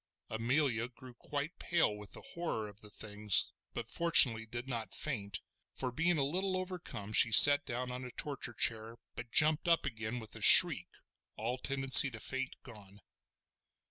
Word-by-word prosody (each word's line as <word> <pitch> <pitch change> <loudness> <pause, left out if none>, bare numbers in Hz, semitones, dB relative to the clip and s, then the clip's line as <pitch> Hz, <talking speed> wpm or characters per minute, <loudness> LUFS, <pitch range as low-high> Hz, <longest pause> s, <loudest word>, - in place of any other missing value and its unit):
Amelia 120 +1 -3
grew 125 0 -18
quite 145 +6 -9
pale 170 -11 -2
with 105 -1 -14
the - - -12
horror 165 -11 -7
of 105 0 -16
the 105 - -12
things, 105 -1 -2 0.2
but 115 -2 -7
fortunately 120 -7 +2
did 120 +3 -10
not 115 -6 -7
faint, 105 -9 -5 0.3
for 130 -1 -6
being 165 +6 -3
a 140 - -2
little 185 +6 -4
overcome 175 - -9
she 115 - +5
sat 145 +6 +9
down 125 0 -7
on 125 +1 -9
a 125 - -10
torture 130 -2 -8
chair, 115 0 -3 0.2
but 120 -1 -11
jumped 155 +6 0
up 170 -2 -1
again 115 -2 -7
with 110 -3 -11
a - - -13
shriek, - - +7 0.5
all 120 +4 -6
tendency 135 +1 +5
to 110 -3 -13
faint 135 +3 -7
gone. 105 -5 -18
125 Hz, 170 wpm, -30 LUFS, 110-145 Hz, 0.5 s, sat